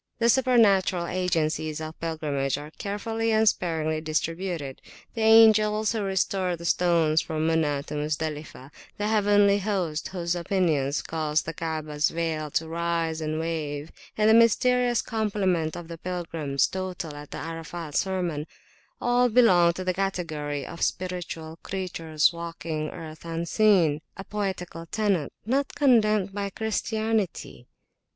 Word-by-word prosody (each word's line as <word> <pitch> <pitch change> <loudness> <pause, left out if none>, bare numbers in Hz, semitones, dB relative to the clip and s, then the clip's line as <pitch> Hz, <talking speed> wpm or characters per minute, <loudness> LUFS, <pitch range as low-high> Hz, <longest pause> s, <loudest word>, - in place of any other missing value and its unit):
The 235 0 +2
supernatural 215 -8 +4
agencies 160 -4 -1
of 155 0 -7
pilgrimage 145 -5 -1
are 150 +1 -8
carefully 225 +5 -2
and 220 0 +3
sparingly 160 -5 0
distributed. 160 -1 -3 0.3
The 225 - -4
angels 220 -1 +6
who 225 -2 -1
restore 190 -2 0
the 170 0 -10
stones 165 -3 +3
from 160 0 -2
Muna 150 -3 +1
to - - -7
Muzdalifah; 150 -2 -4 0.3
the 205 - -1
heavenly 205 -1 +4
host 185 -7 -2
whose 175 -2 -2
pinions 155 -7 +1
cause 155 -1 -1
the 165 - -5
Kaabahs 155 -2 -1
veil 160 -2 -2
to 160 +3 -1
rise 165 -1 -1
and 155 0 -2
to - - -2
wave, 155 -2 -3 0.3
and 215 0 +3
the 220 - +6
mysterious 240 +1 +4
complement 195 -7 -1
of 175 -1 -8
the 165 -1 -8
pilgrims 165 -7 -1
total 185 -5 -5
at 145 0 -10
the - - -7
Arafat 165 -1 -6
sermon, 175 -4 -1 0.5
all 245 0 +3
belong 185 -8 +5
to 185 - -5
the 185 0 0
category 155 -7 -3
of 170 - -9
spiritual 170 -3 -3
creatures 165 -5 0
walking 165 -2 -4
earth 160 -2 -9
unseen,a 170 0 +1
poetical 190 -5 -4
tenet, 200 -7 0
not 270 +5 0
condemned 215 -8 +3
by 200 0 -2
Christianity. 220 - -2
170 Hz, 135 wpm, -26 LUFS, 155-205 Hz, 0.5 s, angels